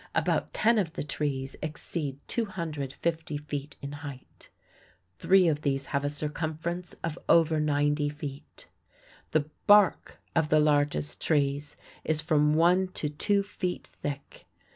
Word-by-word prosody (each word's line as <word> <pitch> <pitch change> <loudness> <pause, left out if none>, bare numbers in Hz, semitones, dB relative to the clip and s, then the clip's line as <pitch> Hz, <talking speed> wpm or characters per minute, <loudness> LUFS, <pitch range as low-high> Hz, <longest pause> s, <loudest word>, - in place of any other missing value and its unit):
About - - +1
ten 230 +1 +3
of 165 -5 -1
the - - -3
trees 140 -2 -3
exceed 155 -2 -4
250 160 - -2
feet 145 -1 -6
in 140 - -4
height. 145 -3 -10 0.7
Three 190 -1 +5
of 150 -2 +1
these 135 -2 0
have 140 0 +1
a 145 - +1
circumference 160 +4 -4
of 165 0 -3
over 160 -2 +5
ninety 145 0 +1
feet. 145 -2 -9 0.6
The 155 -2 +1 0.2
bark 205 -2 +5 0.2
of 160 -2 +2
the 155 - +5
largest 145 - +1
trees 145 -1 0 0.3
is 155 -1 0
from 150 -1 +3
one 180 +3 +4
to 150 - -2
two 200 +7 +1
feet 185 -3 -4 0.2
thick. 140 -1 -6
150 Hz, 135 wpm, -28 LUFS, 145-165 Hz, 0.7 s, Three